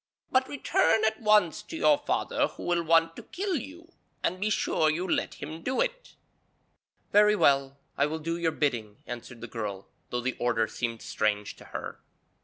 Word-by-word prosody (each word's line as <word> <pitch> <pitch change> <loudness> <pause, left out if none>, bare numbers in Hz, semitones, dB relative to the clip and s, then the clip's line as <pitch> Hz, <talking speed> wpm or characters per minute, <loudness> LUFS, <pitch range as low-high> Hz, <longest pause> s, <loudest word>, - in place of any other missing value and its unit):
'But 260 0 +3
return 225 -5 +2
at 220 +2 0
once 210 -4 +4
to 210 +10 -8
your 300 -2 +4
father 290 - 0
who - - -11
will 175 -1 +1
want 165 0 +3
to - - -6
kill 380 +1 -3
you; 330 +7 -9 0.3
and 185 - 0
be 210 +2 0
sure 160 -6 +2
you 170 +4 -1
let - - 0
him 155 +3 -7
do 260 +8 -1
it.' - - -2 1.0
'Very 210 +1 +6
well, 140 -6 +3 0.2
I 145 - +4
will 155 +2 -3
do 165 +1 -3
your 170 -1 +1
bidding,' 120 -9 -1
answered 120 -1 -8
the 115 - -6
girl, 105 -4 -5 0.2
though 120 - -2
the 130 +1 -1
order 115 -2 +1
seemed 115 -1 -4
strange 105 -1 -1
to - - -14
her. - - -7
165 Hz, 185 wpm, -28 LUFS, -, 1.0 s, Very